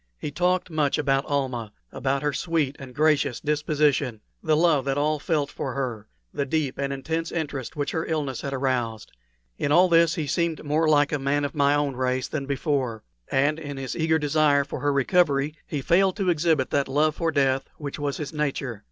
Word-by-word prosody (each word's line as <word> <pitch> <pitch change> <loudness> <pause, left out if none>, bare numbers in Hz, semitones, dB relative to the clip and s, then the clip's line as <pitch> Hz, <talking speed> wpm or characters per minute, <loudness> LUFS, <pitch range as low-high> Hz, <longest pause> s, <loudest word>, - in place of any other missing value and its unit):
He 145 - -5
talked 180 +3 0
much 150 -3 +1
about 135 -1 +1
Almah 130 -6 -2 0.2
about 135 +1 -1
her 150 -1 0
sweet 155 -3 -1
and 130 -3 -10
gracious 150 -4 +2
disposition, 145 -5 +1 0.2
the 155 -2 +2
love 160 -4 +3
that 135 0 0
all 150 +1 +1
felt 145 -2 -1
for 130 - -4
her, 120 -6 -3 0.3
the 140 - -1
deep 140 -1 -2
and 140 0 -1
intense 160 +4 -3
interest 145 -5 -4
which 145 -1 -2
her 160 - -2
illness 145 -6 -2
had 140 - -4
aroused. 125 -5 -2 0.5
In 145 - 0
all 180 +4 +6
this 165 -1 +4
he 155 - -2
seemed 165 +2 -1
more 155 +2 +1
like 145 -1 +4
a 150 - 0
man 140 +2 0
of 145 - -4
my 145 -1 +3
own 145 -2 0
race 130 0 -1
than 140 -3 -4
before, 135 -6 -1 0.2
and 145 +4 +1
in 145 -3 -6
his 135 -1 -4
eager 160 -1 +2
desire 150 -1 +3
for 140 - -6
her 145 - +1
recovery 140 0 +2
he 145 -3 -3
failed 185 +4 +3
to 190 -4 +2
exhibit 160 -4 +1
that 140 -1 +1
love 150 +3 +2
for 165 -1 0
death 135 -2 +1
which 145 -1 -6
was 145 -1 -2
his 150 0 -5
nature. 140 -6 -2
145 Hz, 200 wpm, -25 LUFS, 135-155 Hz, 0.5 s, all